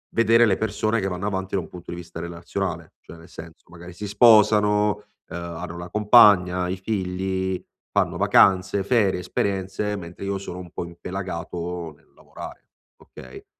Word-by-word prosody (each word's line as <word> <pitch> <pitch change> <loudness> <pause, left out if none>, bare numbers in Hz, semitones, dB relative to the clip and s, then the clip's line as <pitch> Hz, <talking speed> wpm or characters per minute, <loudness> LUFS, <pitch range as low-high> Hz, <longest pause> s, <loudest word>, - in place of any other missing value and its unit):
vedere 115 +1 +5
le 95 - +2
persone 110 +1 -1
che 95 - -2
vanno 95 +2 -3
avanti 95 -1 -4
da 95 - +1
un - - -10
punto 90 -1 -10
di 85 - -6
vista 85 -1 -9
relazionale. 85 0 -5
Cioè 85 - -13
nel 80 +1 -15
senso, 80 -1 -12
magari 85 0 -11
si 105 +3 -7
sposano, 105 -1 +5 0.4
uhm, 85 - -6
hanno 85 0 -7
la 85 0 -8
compagna, 100 -4 +5
i 95 - -3
figli, 95 -2 -2 0.3
fanno - - 0
vacanze, 95 +1 +3
ferie, 100 -4 +2
esperienze, 95 +2 -2
mentre 90 +2 -8
io 100 0 -2
sono 90 -2 -7
un 90 -2 -10
po' - - -5
impelagato 85 -1 -6
nel - - -29
lavorare, - - -11 0.3
okay. 65 0 -13
95 Hz, 165 wpm, -23 LUFS, 85-105 Hz, 0.4 s, vedere